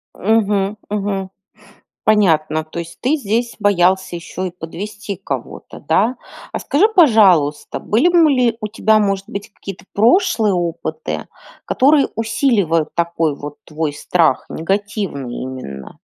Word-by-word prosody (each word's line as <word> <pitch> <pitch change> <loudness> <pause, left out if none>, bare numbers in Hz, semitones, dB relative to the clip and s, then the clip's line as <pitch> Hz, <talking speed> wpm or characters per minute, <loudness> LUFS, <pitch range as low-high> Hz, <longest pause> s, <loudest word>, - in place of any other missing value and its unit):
Мгм, 205 -1 +1
мгм. 200 -2 -2 0.8
Понятно. 160 -7 +2
То 155 +2 -6
есть 170 0 -9
ты 265 +5 +1
здесь 235 -2 -1
боялся 185 -2 +2
еще 185 +2 -5
и - - -9
подвести 200 +5 -7
кого-то, 135 -7 -6
да? 200 - +1 0.4
А - - -2
скажи, 310 +9 +3
пожалуйста, 200 - +4
были 240 +11 +2
б 340 -3 +5
ли 250 -5 +2
у 215 - -3
тебя, 220 0 +2
может 195 -2 -1
быть, 200 +1 -7
какие-то 195 -1 -9
прошлые 225 - +3
опыты, 175 - -3 0.4
которые 280 +2 +3
усиливают 220 - +1
такой 165 -3 0
вот 145 0 -8
твой 155 -1 -3
страх, 160 -1 +1
негативный 195 - -3
именно? 130 - -8
195 Hz, 125 wpm, -18 LUFS, 165-225 Hz, 0.8 s, б